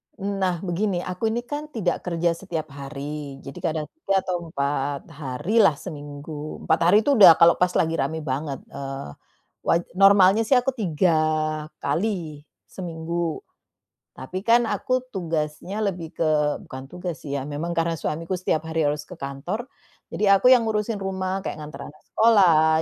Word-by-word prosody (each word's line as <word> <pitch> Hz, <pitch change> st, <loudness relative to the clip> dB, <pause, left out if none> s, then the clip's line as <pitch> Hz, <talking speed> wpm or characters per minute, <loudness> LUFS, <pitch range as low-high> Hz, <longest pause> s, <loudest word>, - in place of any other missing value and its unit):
Nah, 195 Hz, -3 st, -2 dB
begini, 180 Hz, 0 st, -1 dB
aku 180 Hz, +5 st, -2 dB
ini 230 Hz, +2 st, -1 dB
kan 290 Hz, +4 st, -5 dB
tidak 190 Hz, -6 st, 0 dB
kerja 170 Hz, -1 st, +1 dB
setiap 165 Hz, -4 st, -5 dB
hari, 140 Hz, +1 st, -6 dB
jadi 135 Hz, +6 st, -9 dB
kadang 160 Hz, -3 st, -2 dB
3 195 Hz, -12 st, 0 dB
atau 175 Hz, -2 st, -3 dB
4 140 Hz, -2 st, -2 dB
harilah 150 Hz, -, +2 dB
seminggu, 145 Hz, +1 st, -8 dB
4 160 Hz, -, +2 dB
hari 200 Hz, -, +6 dB
itu 280 Hz, -5 st, +2 dB
udah 170 Hz, -5 st, +10 dB
kalau 170 Hz, +1 st, +5 dB
pas 180 Hz, 0 st, +2 dB
lagi 160 Hz, 0 st, +1 dB
rame 160 Hz, -1 st, -2 dB
banget, 140 Hz, 0 st, -3 dB
eee, 135 Hz, -, -6 dB, 0.6 s
waj 170 Hz, -, +4 dB, 0.2 s
normalnya 195 Hz, +2 st, +6 dB
sih 265 Hz, -, +4 dB
aku 250 Hz, +2 st, +2 dB
3 185 Hz, -, +1 dB, 0.7 s
kali 165 Hz, -2 st, -1 dB, 0.2 s
seminggu. 170 Hz, -2 st, -4 dB, 0.7 s
Tapi 185 Hz, +8 st, -5 dB
kan 235 Hz, +3 st, +4 dB
aku 255 Hz, +2 st, -1 dB
tugasnya 170 Hz, +4 st, -2 dB
lebih 175 Hz, -5 st, -4 dB
ke 165 Hz, -, +1 dB, 0.4 s
bukan 130 Hz, 0 st, -8 dB
tugas 175 Hz, -3 st, -6 dB
sih 140 Hz, -1 st, -3 dB
ya, 135 Hz, -, -4 dB
memang 150 Hz, +4 st, -4 dB
karena 165 Hz, 0 st, +1 dB
suamiku 165 Hz, +3 st, -3 dB
setiap 160 Hz, -3 st, -1 dB
hari 160 Hz, 0 st, -1 dB
harus 150 Hz, 0 st, -3 dB
ke 180 Hz, -, -11 dB
kantor, 175 Hz, -, -4 dB, 0.4 s
jadi 200 Hz, -1 st, +3 dB
aku 250 Hz, -, +6 dB
yang 245 Hz, -3 st, +6 dB
ngurusin 215 Hz, 0 st, -1 dB
rumah, 190 Hz, 0 st, -3 dB
kayak 155 Hz, -, -4 dB
nganter 150 Hz, 0 st, -8 dB
anak 150 Hz, -, -23 dB
sekolah, 165 Hz, -8 st, +5 dB
170 Hz, 160 wpm, -24 LUFS, 150-195 Hz, 0.7 s, udah